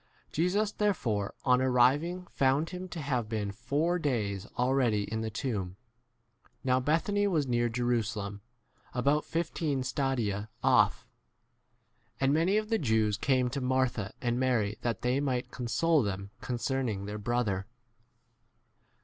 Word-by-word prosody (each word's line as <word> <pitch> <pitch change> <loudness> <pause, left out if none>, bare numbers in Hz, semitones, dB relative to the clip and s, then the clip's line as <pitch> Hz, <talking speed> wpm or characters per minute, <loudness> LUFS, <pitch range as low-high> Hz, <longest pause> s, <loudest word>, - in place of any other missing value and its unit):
17 - - -32
Jesus 195 +6 +1
therefore 115 - 0
[on] 125 -1 +4
arriving 135 +8 +3
found 140 +5 +2
him 185 0 -6
to 175 - -6
have 125 -7 -1
been 105 -3 -2
four 145 - 0
days 105 - -1
18 - - -18
already 125 -4 +2
in 110 +2 -3
the 110 - -2
tomb. 105 -6 -3 0.9
Now 130 -1 +3
Bethany 170 +9 +1
was 160 -7 +1
near 120 -2 +1
Jerusalem, 115 -4 -1 0.5
about 140 +4 +2
fifteen 160 -4 -1
19 - - -2
stadia 120 -6 -1
off, - - +3 1.1
and 135 +1 +3
many 170 +6 +3
of 215 0 -1
the 225 -1 +2
Jews 110 - +2
came 130 +3 +2
to 140 +1 -3
Martha 125 -5 0
and 120 0 +1
Mary 115 -5 +1
that 115 -4 -2
they 125 +2 +2
might 130 -3 -1
console 145 +7 +2
them 100 -2 -3
concern 130 +2 -1
20 110 - 0
ing - - -6
their 105 +1 -5
brother. 105 -4 -1
125 Hz, 150 wpm, -30 LUFS, 110-145 Hz, 1.1 s, on